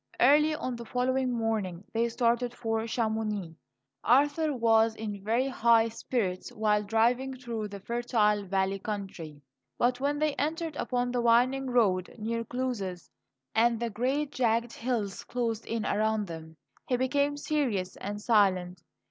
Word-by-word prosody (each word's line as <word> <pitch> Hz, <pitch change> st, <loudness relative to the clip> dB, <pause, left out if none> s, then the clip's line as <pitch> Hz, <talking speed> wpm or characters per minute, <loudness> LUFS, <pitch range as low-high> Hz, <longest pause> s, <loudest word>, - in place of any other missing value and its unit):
Early 300 Hz, +4 st, +5 dB
on 255 Hz, -5 st, -4 dB
the 235 Hz, -, -8 dB
following 255 Hz, +2 st, 0 dB
morning 220 Hz, -6 st, -2 dB
they 230 Hz, +1 st, +1 dB
started 240 Hz, +1 st, 0 dB
for 225 Hz, -1 st, -2 dB
Chamonix. 220 Hz, -6 st, -2 dB, 0.5 s
Arthur 290 Hz, +5 st, +3 dB
was 225 Hz, -3 st, +3 dB
in 205 Hz, -3 st, -6 dB
very 235 Hz, +5 st, +1 dB
high 230 Hz, -3 st, +3 dB
spirits 220 Hz, -5 st, -2 dB
while 210 Hz, -1 st, +1 dB
driving 235 Hz, +5 st, +1 dB
through 235 Hz, -4 st, -4 dB
the 200 Hz, -1 st, -8 dB
fertile 220 Hz, -2 st, +1 dB
valley 195 Hz, +1 st, 0 dB
country; 190 Hz, -8 st, -6 dB, 0.3 s
but 245 Hz, +1 st, +1 dB
when 285 Hz, +2 st, 0 dB
they 305 Hz, 0 st, +1 dB
entered 320 Hz, +1 st, -2 dB
upon 245 Hz, -1 st, -1 dB
the 245 Hz, -1 st, 0 dB
winding 250 Hz, +3 st, +3 dB
road 200 Hz, -8 st, +1 dB
near 230 Hz, +1 st, -2 dB
Cluses, 230 Hz, -8 st, -4 dB, 0.4 s
and 230 Hz, 0 st, +3 dB
the 235 Hz, -1 st, -2 dB
great, 270 Hz, +7 st, -1 dB
jagged 235 Hz, -2 st, 0 dB
hills 225 Hz, -6 st, -3 dB
closed 230 Hz, -3 st, -3 dB
in 225 Hz, -1 st, -2 dB
around 215 Hz, 0 st, +1 dB
them, 160 Hz, -2 st, -9 dB, 0.3 s
he 250 Hz, -, +1 dB
became 285 Hz, +3 st, +1 dB
serious 250 Hz, -12 st, -1 dB
and 205 Hz, +1 st, -5 dB
silent. 185 Hz, -5 st, +2 dB
230 Hz, 145 wpm, -29 LUFS, 210-250 Hz, 0.5 s, Early